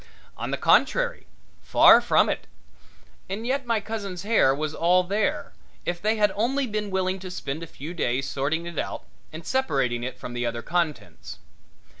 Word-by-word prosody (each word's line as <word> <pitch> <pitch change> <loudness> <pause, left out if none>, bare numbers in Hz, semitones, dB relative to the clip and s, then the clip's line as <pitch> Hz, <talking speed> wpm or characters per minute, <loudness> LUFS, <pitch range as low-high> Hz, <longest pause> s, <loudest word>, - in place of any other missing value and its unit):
On - - -5
the - - -1
contrary, - - +2 0.3
far - - +7
from - - +3
it. - - -3 0.8
And 205 +4 -4
yet 265 +1 -1
my 230 -2 +2
cousin's 200 -4 -5
hair 205 -11 +3
was 155 +1 -3
all 180 +3 +3
there, 200 +4 -1 0.3
if 175 0 -2
they 215 +2 +2
had 210 -2 +3
only 260 +6 +1
been 210 -3 -3
willing 190 0 -1
to 185 0 -7
spend 160 -4 -5
a 165 - -6
few 155 +3 -8
days 135 -5 -1
sorting 145 +5 -1
it 170 -1 -5
out - - -4 0.3
and 160 +1 -9
separating 135 - 0
it 130 +1 -5
from 120 - -8
the 120 0 -2
other 120 0 -3
contents. 170 -3 -3
180 Hz, 175 wpm, -25 LUFS, 145-215 Hz, 0.8 s, far